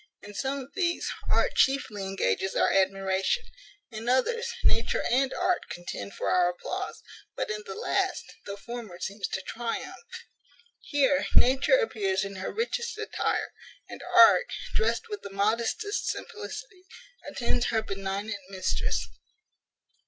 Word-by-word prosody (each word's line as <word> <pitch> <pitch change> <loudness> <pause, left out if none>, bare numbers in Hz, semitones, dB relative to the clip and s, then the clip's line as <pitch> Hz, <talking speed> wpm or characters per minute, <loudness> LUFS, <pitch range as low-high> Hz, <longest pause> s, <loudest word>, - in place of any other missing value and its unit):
In 205 - -9
some 270 +6 -1
of 275 0 -8
these, 345 -3 0 0.2
art - - +3
chiefly 265 -7 +2
engages 190 - 0
our - - +4
admiration; 195 - +2 0.5
in 225 +2 -4
others, 465 - +2
nature 230 - +3
and 265 +2 +3
art 365 - 0
contend 140 -13 -6
for - - -3
our 180 -1 +4
applause; 180 - -5 0.3
but, - - -2
in 210 0 -3
the 195 - -5
last, - - 0 0.2
the 200 0 -5
former 230 -4 -7
seems 200 +2 -3
to 190 - -3
triumph. 230 +3 -4 0.8
Here 280 -2 +2
Nature 265 - +6
appears 205 - 0
in 195 -1 -5
her 185 - -3
richest 465 0 -2
attire, 435 0 -1 0.3
and - - -9
Art, - - +8 0.3
dressed 455 0 +1
with 420 -2 -5
the 200 - -7
modestest 225 - 0
simplicity, 425 -3 -6 0.4
attends 245 0 0
her 220 -2 +1
benignant 200 +1 -3
mistress. 190 -1 -1
225 Hz, 135 wpm, -28 LUFS, 195-290 Hz, 0.8 s, Art